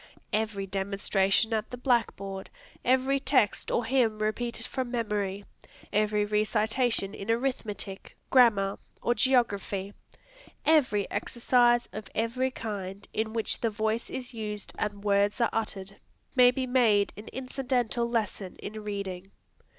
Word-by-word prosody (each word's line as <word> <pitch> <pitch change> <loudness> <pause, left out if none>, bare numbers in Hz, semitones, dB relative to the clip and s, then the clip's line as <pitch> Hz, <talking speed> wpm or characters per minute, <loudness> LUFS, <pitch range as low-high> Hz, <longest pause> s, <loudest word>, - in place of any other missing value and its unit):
Every 215 -2 0
demonstration 195 +2 +1
at 220 -1 -1
the 245 - -6
blackboard, 210 -6 -1 0.3
every 260 +2 +3
text 265 -6 +2
or 235 - +1
hymn 230 -3 +2
repeated 225 +2 -2
from 255 -1 -3
memory, 205 -4 -2 0.5
every 210 0 +2
recitation 215 0 +1
in 195 0 -7
arithmetic, 225 -5 -2
grammar, 210 -6 +5 0.2
or 240 - +3
geography, 210 -5 +1 0.7
every 250 -11 +3
exercise 240 +2 +3
of 215 0 -7
every 235 +4 0
kind 200 -5 -6
in 220 0 -1
which 225 -1 -1
the 230 - +2
voice 220 +2 -1
is 255 -1 -5
used 210 -2 -5
and 205 -1 -3
words 205 +1 +2
are 235 - +2
uttered, 200 -3 -3 0.4
may 250 -1 +8
be 260 +1 -1
made 230 -6 +3
an 210 +2 -10
incidental 255 -2 -1
lesson 215 -5 -2
in 215 +1 -7
reading. 195 -2 -5
220 Hz, 125 wpm, -28 LUFS, 200-245 Hz, 0.7 s, may